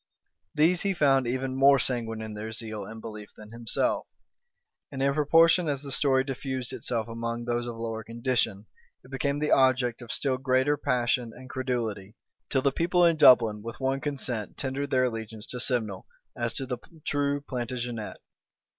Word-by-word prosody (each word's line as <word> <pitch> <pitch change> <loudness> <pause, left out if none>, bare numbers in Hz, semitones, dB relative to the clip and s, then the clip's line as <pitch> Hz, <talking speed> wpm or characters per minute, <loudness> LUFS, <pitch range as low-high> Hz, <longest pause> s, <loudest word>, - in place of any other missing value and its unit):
These 165 +4 +4
he 195 -1 0
found 135 -6 +3
even 130 +1 -2
more 140 +1 +6
sanguine 115 -4 -1
in 110 -1 -6
their 105 +1 -6
zeal 110 -2 -5
and 110 +3 -9
belief 105 -2 -9
than 105 0 -12
himself: 115 0 -1 0.8
and 135 - -6
in 140 +1 +2
proportion 165 +3 +4
as 140 -1 -2
the 140 - -6
story 130 -1 +3
diffused 130 -2 -4
itself 115 -2 -2
among 115 +1 -4
those 120 0 -1
of 120 - -5
lower 115 -1 -4
condition, 115 -3 -1 0.4
it 130 - -16
became 140 +2 -1
the 150 +1 -1
object 130 -2 +3
of 120 - -7
still 130 -2 -1
greater 130 +2 +2
passion 120 -3 0
and 130 0 -11
credulity, 115 -6 -3 0.3
till 135 -1 +1
the 140 - +3
people 175 +4 +2
in 170 -1 +4
Dublin 115 -8 +6
with 115 +2 -8
one 135 0 0
consent 130 -7 -3
tendered 140 +1 -3
their 130 -2 +3
allegiance 110 -3 -4
to 125 - -6
Simnel, 110 -7 -1 0.3
as 120 -1 -2
to 135 - -1
the 125 -1 -4 0.3
true 145 0 0
Plantagenet. 120 -4 -4
125 Hz, 170 wpm, -27 LUFS, 115-135 Hz, 0.8 s, more